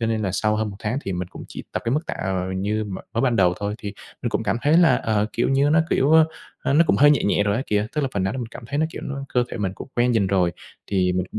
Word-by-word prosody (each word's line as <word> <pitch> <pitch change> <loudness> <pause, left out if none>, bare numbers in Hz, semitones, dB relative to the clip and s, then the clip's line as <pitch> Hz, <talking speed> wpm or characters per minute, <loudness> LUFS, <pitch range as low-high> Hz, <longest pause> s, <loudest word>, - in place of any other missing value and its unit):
Cho 115 - 0
nên 110 -1 -1
là 95 -3 -1
sau 105 +2 +1
hơn 110 -1 -1
một 100 - -10
tháng 110 +5 -2
thì 95 - -3
mình 90 0 -3
cũng - - -10
chỉ - - -7
tập - - -2
cái 115 - 0
mức 155 +4 -1
tạ, - - -3
ờ, 95 -1 -1
như 105 +3 -1
m 100 -2 -6 0.2
mới 115 - +1
ban 125 -3 +2
đầu 90 -3 +4
thôi 105 +1 -2
thì 100 -2 -6 0.3
mình 120 - -1
cũng - - -1
cảm 105 0 0
thấy 150 +3 +4
là, 175 -2 +5
ờ, 105 -2 0
kiểu 115 - 0
như, 140 +2 +3
nó, 160 +1 +5
kiểu, 135 +3 +2
ơ, 160 -1 +7 0.4
ơ, - - 0
nó 160 +4 +5
cũng - - +3
hơi 145 +1 +6
nhẹ 145 - +3
nhẹ 100 - +2
rồi 100 0 +1
á 130 - -1
kìa, 105 0 +1
tức 150 - +1
là 135 - 0
phần 100 - 0
nào 95 +1 0
mình 125 -3 -4
cảm 115 +1 -11
thấy 145 +4 -3
nó, 160 - +2
kiểu, - - -8
nó 140 0 -5
cơ 125 -1 +1
thể - - -6
mình 95 -3 -2
cũng - - -9
quen 120 0 +3
dần 105 -4 +2
rồi 90 -2 +2 0.3
thì 90 -2 +1
mình 90 0 0
cũng - - -3
110 Hz, 330 wpm, -23 LUFS, 100-135 Hz, 0.4 s, ơ